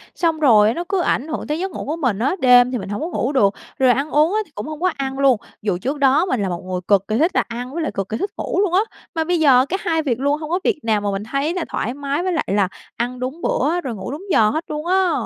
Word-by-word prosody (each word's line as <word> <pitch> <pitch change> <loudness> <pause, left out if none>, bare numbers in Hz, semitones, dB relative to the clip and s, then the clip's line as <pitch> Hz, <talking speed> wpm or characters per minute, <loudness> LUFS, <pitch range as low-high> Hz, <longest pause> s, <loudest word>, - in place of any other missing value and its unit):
xong 330 -3 0
rồi 220 -6 +5
nó 345 - -3
cứ 390 -2 +1
ảnh 300 -4 0
hưởng 315 - -4
tới 300 +2 -2
giấc 380 +1 -3
ngủ - - -6
của 300 - -2
mình 250 -11 -1
á. 265 +10 +1
Đêm 250 0 +6
thì 250 - -1
mình 195 - -6
hổng 205 - -3
có 320 - -2
ngủ 280 -6 -1
được, 205 -8 +3 0.3
rồi 260 -1 +4
ăn 275 +4 0
uống 310 +5 +3
á, 430 - +2
thì 320 - -26
cũng 210 - -5
không 310 -1 -6
có 370 0 +2
ăn 270 0 -3
luôn, 270 -4 +4 0.2
dù 200 -4 0
trước 270 +10 -3
đó 280 +5 +4
mình 255 - -1
là 195 - -1
một 175 -1 -4
người 185 -1 -3
cực 200 -1 +3
kỳ 215 - 0
thích 330 +7 +3
là - - +3
ăn 245 +2 -6
với 335 - -2
lại - - -2
cực 195 -1 -4
kỳ 220 - -2
thích 395 - -3
ngủ - - -2
luôn 380 -4 0
á, 370 - +5 0.4
mà 325 - +1
bây 350 +1 0
giờ 265 -4 +5
cả 380 - 0
hai 320 -3 0
việc 255 -6 -1
luôn 285 +2 +1
hông 305 - -5
có 355 +3 +1
việc 415 -7 +1
nào 220 -2 +1
mà 205 -1 -1
mình 195 +1 -3
thấy 275 +8 -1
là 360 -2 -2
thoải 240 - -2
mái 285 +3 -2
với 370 - 0
lại 325 - -1
là 200 0 +2 0.3
ăn 245 +1 -3
đúng 260 +7 -5
bữa, 355 -9 0
rồi 255 -7 -4
ngủ 210 +5 -6
đúng 300 +6 -6
giờ 215 -8 +5
hết 315 +8 -2
luôn 300 +1 -5
á. 370 0 +2
275 Hz, 310 wpm, -20 LUFS, 230-330 Hz, 0.4 s, Đêm